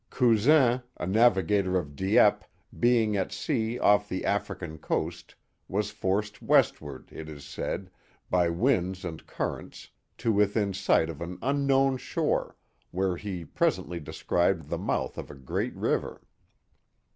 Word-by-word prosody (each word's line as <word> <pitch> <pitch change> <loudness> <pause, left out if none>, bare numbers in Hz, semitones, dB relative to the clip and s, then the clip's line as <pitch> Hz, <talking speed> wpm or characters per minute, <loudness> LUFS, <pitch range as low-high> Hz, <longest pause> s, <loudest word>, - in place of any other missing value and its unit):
Cousin, 125 +2 +4 0.2
a - - -3
navigator 95 -2 +3
of 75 -5 -4
Dieppe, 95 +7 +3 0.3
being 115 -3 +3
at 95 -2 -1
sea 120 -6 -1
off 105 -2 +3
the 95 - -3
African 95 -5 -2
coast, - - -3 0.3
was 105 +2 -1
forced 105 +3 -2
westward, 70 -3 +1
it 80 0 -8
is 70 -2 -10
said, 90 +5 -4 0.4
by 90 -2 +2
winds 95 -2 0
and 80 -2 -6
currents, - - -5 0.3
to 115 - 0
within 105 0 +2
sight 90 -4 +2
of 80 - -11
an 90 +1 -5
unknown 135 0 +2
shore, - - -1 0.3
where 95 0 0
he 90 -3 -5
pres - - +1
ently 85 -3 -7
descried 85 +3 0
the - - -2
mouth - - -2
of - - -7
a - - -9
great 65 -2 -3
river. - - -1
95 Hz, 140 wpm, -28 LUFS, 85-115 Hz, 0.4 s, Cousin